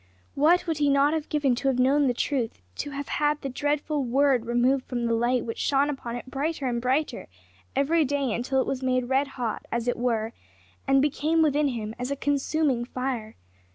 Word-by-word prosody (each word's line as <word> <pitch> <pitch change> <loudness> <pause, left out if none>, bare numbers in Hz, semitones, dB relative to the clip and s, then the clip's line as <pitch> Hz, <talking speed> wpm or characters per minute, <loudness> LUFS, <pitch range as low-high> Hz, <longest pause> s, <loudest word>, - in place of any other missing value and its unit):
What 320 +6 +3
would 325 -3 -2
he 290 -1 +3
not 280 +2 +4
have 315 -1 -3
given 290 -4 +2
to 260 +3 -2
have 265 -2 +2
known 275 +3 +3
the 245 - +1
truth! 245 - -1 0.2
to - - -3
have 280 0 -5
had 295 0 +1
the 275 - -2
dreadful 290 +2 -1
word 255 -1 +2
removed 250 +3 +2
from 240 -2 -3
the 230 - +1
light 240 +2 +1
which 230 - -5
shone 280 +1 +2
upon 240 -4 -5
it 245 - -6
brighter 285 +3 -3
and 240 -2 -1
brighter 260 +1 -1 0.5
every 320 +4 +3
day 280 -4 0
until 265 +4 0
it - - +1
was 265 -1 -2
made 255 -1 0
red 270 +2 +2
hot, 235 -3 -3
as 235 +1 -2
it 245 - 0
were, 230 -2 -1 0.5
and 270 0 +4
became 310 +3 +2
within 300 -1 +2
him 220 -4 -3
as 250 +1 -3
a 280 - -1
consuming 280 -2 0
fire! 250 -3 -4
270 Hz, 205 wpm, -26 LUFS, 245-290 Hz, 0.5 s, not